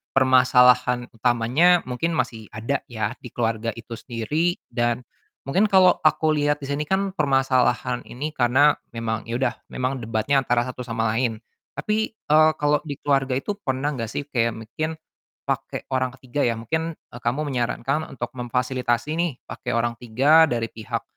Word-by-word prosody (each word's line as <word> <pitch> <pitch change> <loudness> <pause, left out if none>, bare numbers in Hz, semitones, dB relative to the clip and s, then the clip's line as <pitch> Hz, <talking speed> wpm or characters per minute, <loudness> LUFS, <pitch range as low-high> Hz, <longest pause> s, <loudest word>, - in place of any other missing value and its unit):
permasalahan 125 -1 +4
utamanya 125 +9 +3
mungkin 165 +7 -1
masih 120 -7 -2
ada 115 +6 -2
ya, 110 0 -3
di 125 - -12
keluarga 115 -1 -1
itu 115 +1 -9
sendiri 140 +10 -1 0.2
dan 120 0 0 0.5
mungkin 190 +9 +3
kalo 190 -3 +5
aku 155 0 +3
liat 145 -1 +1
di 140 - -6
sini 145 +2 -1
kan 195 +4 0
permasalahan 135 -6 +1
ini 140 +5 -5
karena 130 +4 +4 0.2
memang 115 -1 -3
ya 115 - -5
udah 125 -2 +1 0.2
memang 130 +1 -1
debatnya 115 +3 0
antara 120 0 +2
satu 125 0 -5
sama 115 -2 -1
lain. 115 -3 -1 0.3
Tapi, 215 +1 0
eee, 155 -5 +4
kalau 150 -1 +2
di 145 - -3
keluarga 135 -2 +1
itu 135 +10 -2
pernah 135 -4 -1
nggak 120 -6 -4
sih 130 +6 -4
kayak 115 -2 +1
mungkin 155 +8 -4 0.5
pake - - -3
orang 130 0 +1
ketiga 135 +1 -2
ya, 115 - 0
mungkin, 160 +9 -3
eee, 120 - -14
kamu 120 +5 -1
menyarankan 135 +4 -1
untuk 120 -3 -6
memfasilitasi 125 +1 -1
nih 170 -1 +1
pake 125 -2 -5
orang 120 0 +1
3 140 +8 +5
dari 115 -4 -2
pihak 110 -2 -5
130 Hz, 160 wpm, -23 LUFS, 120-150 Hz, 0.5 s, kalo